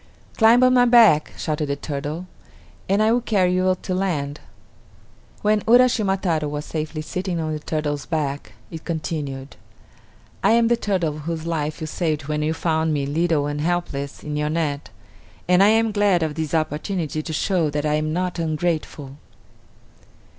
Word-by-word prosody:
"Climb 230 +2 +5
on 255 0 +5
my 245 -1 +5
back," 230 -11 +5
shouted 150 -1 -2
the 140 - -1
turtle, 145 +4 -5 0.6
"and 200 +2 +3
I 220 - +3
will 245 +1 +2
carry 190 -6 +1
you 185 0 +2
to 185 - -2
land." 155 -7 -2 1.0
When 210 0 +3
Uraschima 230 -5 +4
Taro 160 -6 0
was 145 +1 -4
safely 155 0 -4
sitting 180 +2 -3
on 155 -1 -2
the 155 - -3
turtle's 150 -2 -3
back 145 -4 -3 0.2
it 160 -1 -8
continued: 150 -5 -4 0.9
"I - - +5
am 230 0 +4
the 240 - +4
turtle 175 -9 -1
whose 160 +1 -4
life 155 -1 -3
you - - -2
saved 155 -2 -2
when 150 0 -1
you 155 +1 0
found 160 -2 0
me, 140 -1 -1
little 155 0 +1
and 145 0 -3
helpless, 155 -5 -3
in 150 -1 -4
your 150 0 -1
net, 150 -3 -2 0.6
and 180 +1 +4
I 200 - +7
am 225 +1 +3
glad 200 -4 +2
of 155 -2 -2
this 160 0 -3
opportunity 155 +1 -2
to 160 - -6
show 165 +1 0
that 145 +1 -2
I 150 - +1
am 155 0 0
not 180 +1 -2
ungrateful." 155 -3 -2
160 Hz, 170 wpm, -22 LUFS, 150-185 Hz, 1.0 s, I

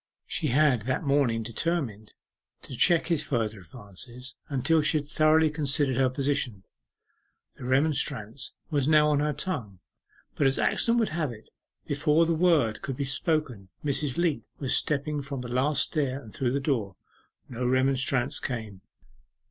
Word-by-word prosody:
She 160 - -2
had 140 -2 +3
that 130 - 0
morning 135 -6 +1
determined 115 -3 -3 0.5
to 130 - -8
check 170 +6 +4
his 170 -3 +1
further 110 -5 -2
advances, 120 +5 -9
until 150 +4 +2
she 155 +1 +2
had 145 - -3
thoroughly 155 +1 +3
considered 145 -3 +2
her 130 0 +3
position. 130 -6 -1 0.9
The - - -8
remonstrance 130 -3 -1 0.2
was 145 -3 +1
now 150 -1 +5
on 145 - +2
her 150 +1 +1
tongue, 140 - -4 0.6
but 140 - +2
as 135 - +1
accident 230 0 +2
would 225 -2 +2
have 155 -4 -2
it, 110 -2 -13 0.4
before 150 +3 +2
the 165 - +1
word 160 -10 +2
could 135 -2 -5
be 140 - -1
spoken 135 - -1 0.2
Mrs. 140 -1 0
Leat 170 -3 +1
was 135 -3 0
stepping 150 0 0
from 140 -2 -5
the 125 - -6
last 135 +4 +2
stair 140 -5 -2
to 130 - 0
the 135 +3 0
floor, 120 - -1 0.5
and 120 - -10
no 125 - 0
remonstrance 130 +1 +1
came. 110 -6 -5
140 Hz, 155 wpm, -27 LUFS, 125-150 Hz, 0.9 s, now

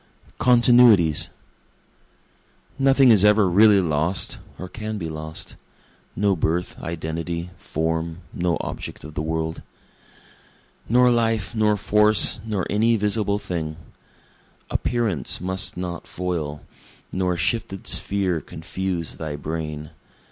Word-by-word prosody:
Continuities 120 -9 +5 1.5
Nothing 135 -1 +5
is 105 -3 +5
ever 105 -1 +5
really 100 +3 +6
lost, 80 +2 0 0.2
or 90 - -7
can 110 +2 -5
be 85 -5 -4
lost, 80 0 -5 0.6
No 100 0 +2
birth, 85 +2 -1
identity, 85 +1 -4
form 80 +2 -3
no 85 -1 0
object - - -7
of 80 - -9
the 75 - -3
world. 80 0 -3 1.3
Nor 125 +2 +5
life, 115 -3 0
nor 105 -2 +2
force, 105 +2 +4
nor 105 -5 -2
any 115 +3 +2
visible 105 0 0
thing; 85 -6 -4 0.9
Appearance 110 - -1
must 95 +1 -2
not 90 -1 -5
foil, 80 -5 -4 0.5
nor 90 -1 -1
shifted 95 0 -2
sphere 95 -5 0
confuse 85 0 -5
thy 80 -2 -5
brain. 75 0 -5
90 Hz, 110 wpm, -23 LUFS, 80-105 Hz, 1.5 s, really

